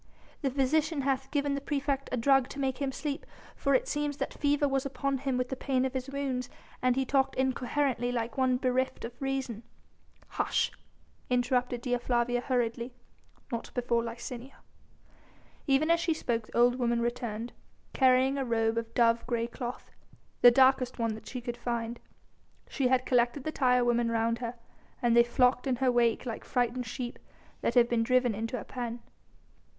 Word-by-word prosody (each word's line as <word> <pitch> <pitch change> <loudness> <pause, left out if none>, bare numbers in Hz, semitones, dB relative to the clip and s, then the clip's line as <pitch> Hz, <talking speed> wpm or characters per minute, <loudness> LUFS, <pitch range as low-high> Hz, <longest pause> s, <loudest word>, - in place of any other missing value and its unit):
"The 275 - +1
physician 285 +3 +1
hath 270 0 -1
given 285 -1 0
the 280 - -2
praefect 280 -1 -2
a 255 - 0
drug 270 +1 +3
to 280 - -8
make 265 -1 -1
him 275 -2 -1
sleep, 290 +2 -4 0.3
for 275 -1 +2
it - - +1
seems 295 -1 -2
that - - -3
fever 290 0 +1
was 270 -1 0
upon 275 -1 -2
him 265 -1 -1
with 250 0 -1
the 265 - -2
pain 260 -1 0
of 260 - -2
his 260 0 -3
wounds 265 -3 -3 0.3
and 255 -1 +3
he 265 0 +1
talked 270 0 +1
incoherently 260 -1 0
like 235 -1 -2
one 260 -1 +2
bereft 255 -1 -1
of 230 - -7
reason." 270 -5 -2 0.7
"Hush!..." - - 0 0.6
interrupted 245 -1 +1
Dea 245 -1 0
Flavia 240 0 0
hurriedly, 245 -1 -1 0.6
"not 235 -1 -4
before 240 -1 +1
Licinia." 235 +3 -7 1.1
Even 285 +4 +3
as 335 - +4
she 330 -1 0
spoke 230 -7 -2
the - - -6
old 245 +1 +4
woman 235 -1 +1
returned, 235 -1 -3 0.4
carrying 260 +1 +4
a - - 0
robe 225 -2 +1
of 230 0 -8
dove 230 -1 +3
grey 235 -2 0
cloth, 240 +1 -6 0.5
the 245 - +10
darkest 260 0 +4
one 230 -2 0
that 215 - -10
she 250 - -5
could 240 0 -5
find. 235 -1 -3 0.7
She 270 -3 0
had 255 0 +2
collected 245 +2 +2
the 310 - -2
tire 250 -4 +3
women 240 -1 +2
round 230 0 0
her, 240 0 -4 0.4
and 235 -1 +2
they 235 - +8
flocked 250 +2 +2
in 260 - +2
her 255 +1 +2
wake 240 0 +2
like 230 -3 -5
frightened 245 0 -1
sheep 240 +1 -5 0.4
that 235 - 0
have 240 -1 +6
been 235 -1 +1
driven 250 0 +2
into 225 +4 -3
a - - -7
pen. 240 -1 -5
250 Hz, 180 wpm, -30 LUFS, 235-270 Hz, 1.1 s, the